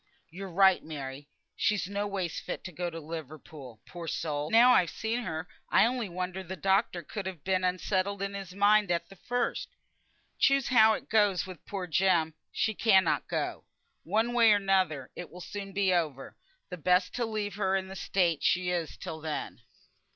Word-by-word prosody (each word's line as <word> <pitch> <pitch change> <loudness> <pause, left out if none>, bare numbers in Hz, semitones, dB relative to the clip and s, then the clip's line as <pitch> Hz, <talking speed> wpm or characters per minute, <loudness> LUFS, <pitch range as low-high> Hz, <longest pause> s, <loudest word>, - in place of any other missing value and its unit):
"Yo're 190 +3 -7
right, 190 +1 +4
Mary! 145 -2 -7 0.3
She's 205 -4 +1
no 200 +1 -2
ways 190 -4 -3
fit - - -6
to 185 - -7
go 175 +1 -3
to 165 -1 -7
Liverpool, 150 -5 -9
poor 170 -2 -8
soul. 150 -2 -2
Now 240 +3 +7
I've 180 -9 +4
seen 225 +2 -2
her, 160 0 -4 0.2
I - - +5
only 240 -3 -1
wonder 180 +1 -4
the 190 0 -6
doctor 190 -2 +1
could 195 +5 -5
ha' 180 -6 -7
been 185 -1 0
unsettled 185 +2 0
in 200 0 -3
his 195 -2 -7
mind 205 0 +4
at 170 +1 -1
th' 195 - -13
first. 245 +4 -2 0.7
Choose 275 -2 +3
how 220 -3 +6
it - - -5
goes 205 -4 +2
wi' 185 -4 -9
poor 195 -3 -4
Jem, 170 -2 +2 0.2
she 220 - 0
cannot 195 -3 +3
go. - - -3 0.4
One 225 +3 0
way 230 -2 +6
or - - +6
another 185 -9 +1
it 175 - -7
will 180 - -11
soon 195 +2 -7
be 195 -1 +2
over, 150 -6 -2 0.4
and 180 -4 -8
best 180 0 +3
to 245 - -1
leave 210 -2 -3
her 195 -1 0
in 190 -1 -1
the 190 - -8
state 175 -5 0
she 180 0 +2
is 170 -3 -3
till 160 -1 -7
then." 155 -1 -5
185 Hz, 190 wpm, -29 LUFS, 170-205 Hz, 0.7 s, Now